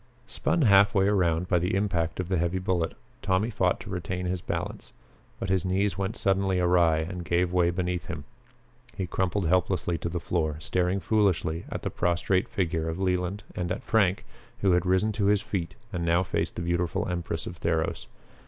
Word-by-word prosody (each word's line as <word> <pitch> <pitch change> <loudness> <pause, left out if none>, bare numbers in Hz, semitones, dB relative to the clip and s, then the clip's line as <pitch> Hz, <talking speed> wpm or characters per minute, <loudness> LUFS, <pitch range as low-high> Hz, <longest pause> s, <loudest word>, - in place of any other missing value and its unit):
Spun 170 - 0
half 100 -2 +6
way 95 0 +4
around 90 -4 +2
by 90 - +3
the 90 +2 0
impact 90 -5 0
of 90 - -2
the 95 -2 0
heavy 85 +2 0
bullet, 90 -3 -1 0.3
Tommy 100 +4 +1
fought 95 -4 +1
to - - -9
retain 90 0 -3
his 90 -1 -2
balance. - - -4 0.5
But 95 - -3
his 95 -2 +2
knees 95 0 +1
went 100 +3 -2
suddenly 95 -3 +1
awry 85 -2 +4
and 85 +3 -4
gave 85 +1 +1
way 90 -1 +3
beneath 90 0 -2
him. 80 -5 -5 0.7
He 95 - -1
crumpled 95 +1 -1
helplessly 90 0 +1
to 85 - -3
the 85 +1 -3
floor, 80 -3 -1
staring 90 +3 0
foolishly 90 -5 +1
at - - -5
the - - -2
prostrate 90 +5 +1
figure 85 -7 -1
of 80 - -3
Leland 90 +1 -1
and 90 -1 -2
at 125 - -3
Frank, 100 -7 +2 0.4
who 95 - +3
had 90 +1 +2
risen 95 +4 +3
to 105 -1 -1
his 105 0 +3
feet 90 -5 -3 0.2
and 85 - -2
now 85 +2 +3
faced - - -2
the 85 - -3
beautiful 85 -1 0
empress 85 -2 -3
of 90 - -7
Theros. 80 -1 -1
90 Hz, 190 wpm, -27 LUFS, 85-95 Hz, 0.7 s, half